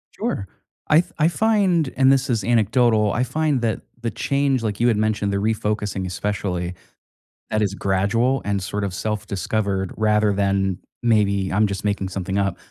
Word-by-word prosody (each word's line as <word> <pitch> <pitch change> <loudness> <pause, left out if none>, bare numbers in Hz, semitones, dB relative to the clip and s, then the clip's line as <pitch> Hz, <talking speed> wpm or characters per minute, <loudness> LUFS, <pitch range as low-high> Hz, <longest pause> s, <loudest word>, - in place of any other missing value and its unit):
Sure. 100 - -3 0.4
I 155 - +6
f 175 - -2
I 155 - +5
find 185 -6 +2
and 135 0 +5
this 135 0 +2
is 115 -4 0
anecdotal, 115 -1 +3
I 125 - +1
find 145 0 0
that 110 -2 -1 0.2
the 115 -2 -2
change, 140 -1 0
like 105 -2 -2
you 120 - +3
had 110 -3 +3
mentioned, 105 -2 0
the - - +1
refocusing, 105 -2 -1
especially, 90 -1 -3 0.7
that 110 0 0
is 100 -1 0
gradual 105 +8 +1
and 100 -1 -1
sort 100 +2 -3
of 100 - -3
self-discovered 100 -1 -2
rather 105 -1 +2
than, 95 -1 0 0.2
maybe 100 -4 +2
I'm 105 +2 +3
just 100 0 -4
making 100 -2 -1
something 95 +1 -3
up, 100 -1 0
105 Hz, 170 wpm, -22 LUFS, 100-120 Hz, 0.7 s, I